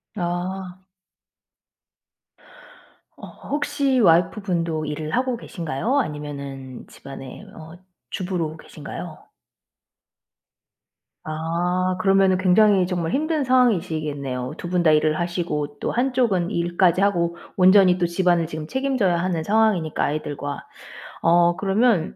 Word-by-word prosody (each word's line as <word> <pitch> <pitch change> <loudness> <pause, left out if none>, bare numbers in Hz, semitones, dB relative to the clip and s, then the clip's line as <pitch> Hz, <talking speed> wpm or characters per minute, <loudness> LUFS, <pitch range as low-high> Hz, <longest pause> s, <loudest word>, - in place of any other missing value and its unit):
아. 180 +1 -4 2.4
어. - - -10 0.2
혹시 285 -3 0
와이프분도 170 -3 +1
일을 155 +1 -4
하고 250 -1 0
계신가요? 175 - -2
아니면은 140 - -6
집안에 135 +5 -10
어 160 +2 -12 0.3
주부로 175 -4 -3
계신가요? - - -9 2.0
아. 175 +4 -1
그러면은 195 -1 +3
굉장히 185 0 +4
정말 175 -3 -2
힘든 310 0 0
상황이시겠네요. 155 - 0
2 175 - -6
분 180 -1 +1
다 155 - +5
일을 155 0 +2
하시고 170 -4 -3
또 - - -2
한쪽은 240 -8 +1
일까지 175 +1 +1
하고 170 -4 +1 0.2
온전히 185 -1 +6
또 175 -1 +1
집안을 175 -1 +1
지금 155 -1 -6
책임져야 255 -9 0
하는 170 -2 -1
상황이니까 205 -6 +1
아이들과. 145 -1 -4 0.6
어 175 +1 +4
그러면 200 -2 +1
175 Hz, 255 characters per minute, -22 LUFS, 155-195 Hz, 2.4 s, 온전히